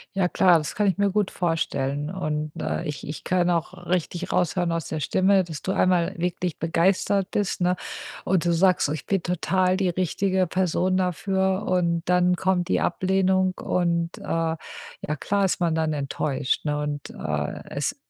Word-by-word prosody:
Ja, 185 Hz, -2 st, +2 dB
klar. 180 Hz, -1 st, +5 dB
Das 150 Hz, -1 st, -4 dB
kann 210 Hz, -1 st, +2 dB
ich 190 Hz, -, +1 dB
mir 200 Hz, 0 st, +2 dB
gut 205 Hz, 0 st, 0 dB
vorstellen. 145 Hz, -4 st, -1 dB
Und, 155 Hz, -5 st, -3 dB
äh, -, -, -2 dB
ich 150 Hz, -2 st, -5 dB
ich 150 Hz, -, -6 dB
kann 180 Hz, -1 st, +1 dB
auch 175 Hz, +1 st, -2 dB
richtig 180 Hz, 0 st, -1 dB
raushören 175 Hz, 0 st, +1 dB
aus 165 Hz, -2 st, -3 dB
der 155 Hz, -, -3 dB
Stimme, 190 Hz, +3 st, +3 dB
dass 160 Hz, -4 st, -7 dB
du 190 Hz, -, -2 dB
einmal 185 Hz, 0 st, +2 dB
wirklich 175 Hz, -1 st, -2 dB
begeistert 185 Hz, +4 st, +1 dB
bist, 200 Hz, -3 st, -1 dB
ne? 180 Hz, 0 st, +2 dB, 0.5 s
Und 185 Hz, -2 st, +2 dB
du 175 Hz, -, +3 dB
sagst 180 Hz, -1 st, +3 dB
so: -, -, -3 dB
„Ich 155 Hz, -, -4 dB
bin 195 Hz, -3 st, 0 dB
total 185 Hz, +1 st, +1 dB
die 195 Hz, -2 st, +1 dB
richtige 185 Hz, +1 st, 0 dB
Person 185 Hz, 0 st, +1 dB
dafür.“ 190 Hz, +2 st, 0 dB
Und 170 Hz, -2 st, +1 dB
dann 180 Hz, 0 st, +4 dB
kommt 180 Hz, -1 st, 0 dB
die -, -, +1 dB
Ablehnung. 190 Hz, 0 st, +2 dB
Und, 170 Hz, -1 st, 0 dB
äh, -, -, -12 dB
ja 165 Hz, 0 st, -1 dB, 0.6 s
klar 200 Hz, +4 st, +1 dB
ist 185 Hz, -, -1 dB
man 165 Hz, -2 st, +2 dB
dann 160 Hz, -1 st, 0 dB
enttäuscht, 140 Hz, -1 st, -1 dB
ne 150 Hz, 0 st, 0 dB
und, 145 Hz, -1 st, -4 dB
äh, 75 Hz, -1 st, -3 dB
es -, -, -2 dB
180 Hz, 180 wpm, -25 LUFS, 165-185 Hz, 0.6 s, klar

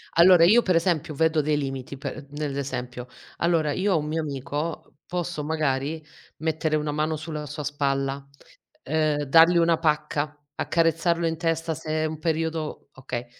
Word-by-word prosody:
Allora, 170 Hz, 0 st, +7 dB
io 215 Hz, +8 st, +7 dB
per 185 Hz, -6 st, +1 dB
esempio 165 Hz, -3 st, +1 dB
vedo 160 Hz, +1 st, +2 dB
dei 150 Hz, 0 st, +1 dB
limiti 135 Hz, -1 st, -4 dB
per 140 Hz, +2 st, -6 dB
nell'esempio. 135 Hz, -4 st, -4 dB, 0.3 s
Allora, 165 Hz, -3 st, +2 dB
io 190 Hz, +5 st, +1 dB
ho -, -, +3 dB
un 150 Hz, -1 st, -2 dB
mio 160 Hz, +1 st, -1 dB
amico, 145 Hz, +3 st, -4 dB
posso 175 Hz, -3 st, -3 dB
magari 150 Hz, 0 st, -1 dB, 0.4 s
mettere 160 Hz, -1 st, 0 dB
una 150 Hz, -1 st, -1 dB
mano 155 Hz, +1 st, 0 dB
sul 155 Hz, +1 st, -6 dB
sulla 150 Hz, 0 st, -4 dB
sua 150 Hz, +1 st, -6 dB
spalla, 135 Hz, -1 st, -1 dB, 0.7 s
uhm, 155 Hz, -1 st, +1 dB
dargli 165 Hz, +5 st, +6 dB
una 165 Hz, -1 st, +4 dB
pacca, 150 Hz, -2 st, -1 dB, 0.2 s
accarezzarlo 165 Hz, +1 st, +1 dB
in 165 Hz, -1 st, -1 dB
testa 165 Hz, -1 st, -1 dB
se 155 Hz, +1 st, -9 dB
è -, -, +1 dB
un 155 Hz, 0 st, -4 dB
periodo 160 Hz, -1 st, -2 dB
okay. 125 Hz, -2 st, -5 dB
155 Hz, 160 wpm, -25 LUFS, 145-165 Hz, 0.7 s, Allora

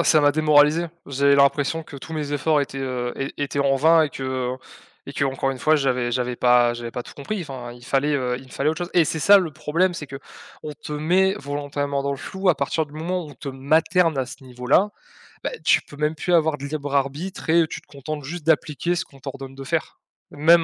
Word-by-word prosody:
Ah -, -, +4 dB
ça 155 Hz, -2 st, +5 dB
m'a 145 Hz, 0 st, +4 dB
démoralisé. 155 Hz, +2 st, +4 dB, 0.2 s
J'ai 140 Hz, +1 st, +3 dB
l'impression 145 Hz, +3 st, +2 dB
que 140 Hz, -, -10 dB
tous 160 Hz, -, -9 dB
mes 150 Hz, -2 st, -3 dB
efforts 150 Hz, +1 st, +2 dB
étaient, 135 Hz, -1 st, -4 dB
heu, 125 Hz, -2 st, -3 dB
é 135 Hz, 0 st, -3 dB
étaient 145 Hz, 0 st, -1 dB
en 135 Hz, -1 st, +3 dB
vain 160 Hz, +4 st, +5 dB
et 150 Hz, -, -1 dB
que, 135 Hz, -, -7 dB, 0.3 s
heu, -, -, -10 dB, 0.5 s
et -, -, -7 dB
qu'encore 135 Hz, -1 st, 0 dB
une 130 Hz, -, -8 dB
fois 155 Hz, 0 st, +4 dB
j'avais 125 Hz, -4 st, 0 dB
j'avais 125 Hz, 0 st, -1 dB
pas 120 Hz, -1 st, +4 dB
j'avais 120 Hz, 0 st, -6 dB
pas 120 Hz, +1 st, -5 dB
tout -, -, -12 dB
compris. 195 Hz, +9 st, -4 dB
Enfin, 130 Hz, -5 st, -7 dB
il 120 Hz, 0 st, -13 dB
fallait, 140 Hz, +3 st, +1 dB
heu, 125 Hz, -3 st, 0 dB
il 130 Hz, -, -9 dB
me -, -, -18 dB
fallait 140 Hz, +4 st, 0 dB
autre 160 Hz, -, -4 dB
chose. 175 Hz, 0 st, -4 dB
Et 175 Hz, -, +5 dB
c'est 160 Hz, +1 st, -2 dB
ça 200 Hz, +4 st, +8 dB
le 175 Hz, -5 st, -2 dB
problème, 175 Hz, +6 st, 0 dB
c'est 150 Hz, -4 st, -7 dB
qu'on 140 Hz, +2 st, -10 dB
te 150 Hz, -, -6 dB
met 180 Hz, +6 st, +2 dB
volontairement 145 Hz, -2 st, -3 dB
dans 140 Hz, -, -1 dB
le 140 Hz, -, -2 dB
flou 190 Hz, +6 st, -3 dB
à 160 Hz, -, +4 dB
partir 150 Hz, +3 st, -1 dB
du 145 Hz, -, -18 dB
moment 170 Hz, +3 st, -3 dB
où 150 Hz, -, -10 dB
on -, -, -13 dB
te 140 Hz, +3 st, -8 dB
materne 155 Hz, +4 st, +2 dB
à 130 Hz, -, 0 dB
ce 135 Hz, -, -11 dB
niveau-là, 125 Hz, +10 st, +1 dB, 0.5 s
bah, -, -, 0 dB
tu -, -, +4 dB
peux 145 Hz, -, -14 dB
même 150 Hz, +1 st, 0 dB
plus 175 Hz, +3 st, -2 dB
avoir 155 Hz, -3 st, +2 dB
de 140 Hz, -, -5 dB
libre-arbitre 145 Hz, +4 st, -2 dB
et 165 Hz, 0 st, +5 dB
tu -, -, -7 dB
te -, -, -31 dB
contentes 145 Hz, +1 st, -6 dB
juste 160 Hz, +2 st, -6 dB
d'appliquer 160 Hz, +1 st, +1 dB
ce -, -, -2 dB
qu'on 135 Hz, -, -18 dB
t'ordonne 135 Hz, 0 st, -8 dB
de 135 Hz, -, -8 dB
faire. -, -, -3 dB, 0.3 s
Même 165 Hz, +3 st, +5 dB
145 Hz, 240 wpm, -23 LUFS, 135-160 Hz, 0.5 s, ça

